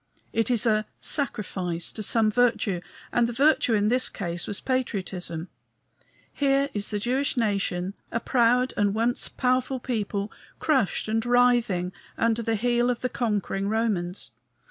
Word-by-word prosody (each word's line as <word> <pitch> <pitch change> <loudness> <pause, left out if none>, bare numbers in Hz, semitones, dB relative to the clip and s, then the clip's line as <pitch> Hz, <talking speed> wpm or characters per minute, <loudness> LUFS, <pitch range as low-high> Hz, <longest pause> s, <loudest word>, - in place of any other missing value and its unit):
It 225 0 +1
is 240 -1 +3
a 215 -1 +2
"sacrifice" 185 - 0
to 220 - -6
some 215 +1 +2
virtue; 225 -6 +1 0.3
and 240 -1 +2
the - - -3
virtue 270 -3 +3
in 210 0 +2
this 250 +2 +2
case 175 -3 -4
was 205 - 0
patriotism. 185 -9 -3 0.9
Here 275 0 +2
is 205 -1 -2
the 210 - -1
Jewish 255 +6 0
nation, 195 -4 0 0.2
a 230 - 0
proud 250 +1 +2
and 205 0 +1
once 235 +2 0
powerful 255 +1 0
people, 210 -4 -3 0.3
crushed 265 - +1
and 225 +1 0
writhing 240 -7 +2 0.3
under 230 0 +1
the 225 0 0
heel 240 +2 +1
of 245 -1 -1
the 255 - -1
conquering 205 -4 -1
Romans. 185 - -1
225 Hz, 145 wpm, -26 LUFS, 200-245 Hz, 0.9 s, is